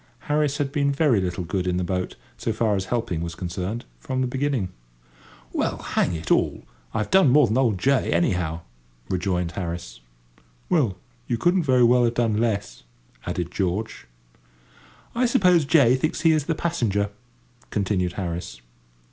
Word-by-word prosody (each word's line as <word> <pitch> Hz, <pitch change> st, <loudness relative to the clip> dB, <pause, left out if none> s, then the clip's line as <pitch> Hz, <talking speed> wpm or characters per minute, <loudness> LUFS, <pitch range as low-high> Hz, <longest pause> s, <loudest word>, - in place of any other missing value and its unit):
Harris 150 Hz, -1 st, 0 dB
had 140 Hz, -2 st, -1 dB
been 140 Hz, -1 st, +1 dB
very 140 Hz, -7 st, +3 dB
little 90 Hz, 0 st, -2 dB
good 90 Hz, +2 st, -2 dB
in 90 Hz, 0 st, +1 dB
the 90 Hz, -, 0 dB
boat, 90 Hz, 0 st, -2 dB, 0.2 s
so 115 Hz, -, -2 dB
far 110 Hz, -1 st, +1 dB
as 95 Hz, -1 st, -2 dB
helping 95 Hz, -7 st, -2 dB
was 85 Hz, 0 st, -4 dB
concerned, 90 Hz, +6 st, -4 dB
from 130 Hz, -, -3 dB
the -, -, +2 dB
beginning. 130 Hz, -5 st, -1 dB, 0.8 s
"Well, -, -, 0 dB
hang 85 Hz, -, 0 dB
it 80 Hz, 0 st, -5 dB
all, -, -, +2 dB, 0.3 s
I've 105 Hz, -, -2 dB
done 190 Hz, -6 st, +6 dB
more 145 Hz, +2 st, +6 dB
than 115 Hz, +3 st, +1 dB
old 115 Hz, -7 st, +2 dB
J., 135 Hz, +7 st, +2 dB
anyhow," 85 Hz, -1 st, 0 dB, 0.5 s
rejoined 90 Hz, -2 st, -1 dB
Harris. 85 Hz, -5 st, -5 dB, 0.7 s
"Well, 130 Hz, -, +2 dB, 0.3 s
you 120 Hz, -, 0 dB
couldn't 175 Hz, +7 st, +3 dB
very 130 Hz, -3 st, +4 dB
well 120 Hz, +1 st, +5 dB
have 120 Hz, 0 st, +1 dB
done 115 Hz, -3 st, +1 dB
less," 105 Hz, -4 st, -2 dB, 0.5 s
added 85 Hz, -1 st, -3 dB
George. 95 Hz, -, -2 dB, 1.1 s
"I 245 Hz, +1 st, +2 dB
suppose 180 Hz, -8 st, +4 dB
J. 140 Hz, -5 st, +5 dB
thinks 155 Hz, +5 st, -1 dB
he 165 Hz, -, +5 dB
is 155 Hz, -3 st, +1 dB
the 165 Hz, -, 0 dB
passenger," 105 Hz, -, 0 dB, 0.6 s
continued 95 Hz, -3 st, 0 dB
Harris. 85 Hz, -8 st, -5 dB
110 Hz, 160 wpm, -24 LUFS, 90-140 Hz, 1.1 s, done